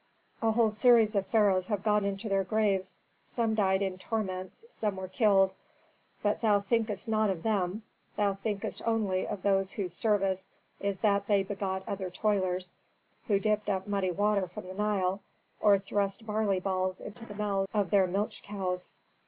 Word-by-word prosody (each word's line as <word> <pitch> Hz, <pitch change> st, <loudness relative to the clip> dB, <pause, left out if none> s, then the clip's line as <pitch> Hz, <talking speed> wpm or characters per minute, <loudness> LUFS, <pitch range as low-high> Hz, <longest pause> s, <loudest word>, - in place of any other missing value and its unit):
A 225 Hz, -1 st, +3 dB
whole 225 Hz, -1 st, +3 dB
series 225 Hz, 0 st, +5 dB
of 195 Hz, -1 st, +1 dB
pharaohs 200 Hz, -5 st, +3 dB
have 205 Hz, -3 st, -2 dB
gone 210 Hz, -1 st, +2 dB
into 200 Hz, +2 st, -3 dB
their 195 Hz, -1 st, +2 dB
graves; 195 Hz, -2 st, 0 dB, 0.3 s
some 230 Hz, -3 st, -1 dB
died 195 Hz, -2 st, +2 dB
in 185 Hz, -1 st, -3 dB
torments, 190 Hz, -, -4 dB
some 215 Hz, -, -2 dB
were 190 Hz, 0 st, -5 dB
killed. 195 Hz, -1 st, +4 dB, 0.7 s
But 205 Hz, 0 st, +1 dB
thou 210 Hz, -3 st, +4 dB
thinkest 215 Hz, 0 st, -1 dB
not 215 Hz, -1 st, +2 dB
of 180 Hz, -4 st, -3 dB
them; 205 Hz, -1 st, 0 dB, 0.3 s
thou 205 Hz, -1 st, +2 dB
thinkest 200 Hz, +1 st, -4 dB
only 210 Hz, -5 st, +1 dB
of 195 Hz, -, -5 dB
those 195 Hz, -1 st, +2 dB
whose 185 Hz, -4 st, -3 dB
service 195 Hz, -2 st, 0 dB, 0.3 s
is 200 Hz, -1 st, -1 dB
that 200 Hz, -1 st, +2 dB
they 200 Hz, -2 st, +3 dB
begot 190 Hz, -1 st, -3 dB
other 190 Hz, -2 st, -3 dB
toilers 185 Hz, -2 st, -1 dB, 0.5 s
who 205 Hz, -4 st, +3 dB
dipped 210 Hz, 0 st, 0 dB
up 190 Hz, -1 st, -1 dB
muddy 200 Hz, -2 st, 0 dB
water 200 Hz, +1 st, +1 dB
from 180 Hz, +1 st, -9 dB
the 185 Hz, -, -7 dB
Nile, 195 Hz, -1 st, 0 dB, 0.4 s
or 205 Hz, -1 st, +5 dB
thrust 200 Hz, +2 st, -2 dB
barley 210 Hz, -3 st, +1 dB
balls 185 Hz, 0 st, -1 dB
into 220 Hz, +3 st, -9 dB
the 205 Hz, -, -9 dB
mouths 200 Hz, -2 st, -1 dB
of 205 Hz, -5 st, 0 dB
their 195 Hz, -2 st, +5 dB
milch 200 Hz, +4 st, -2 dB
cows. 185 Hz, -3 st, -4 dB
200 Hz, 170 wpm, -30 LUFS, 190-210 Hz, 0.7 s, series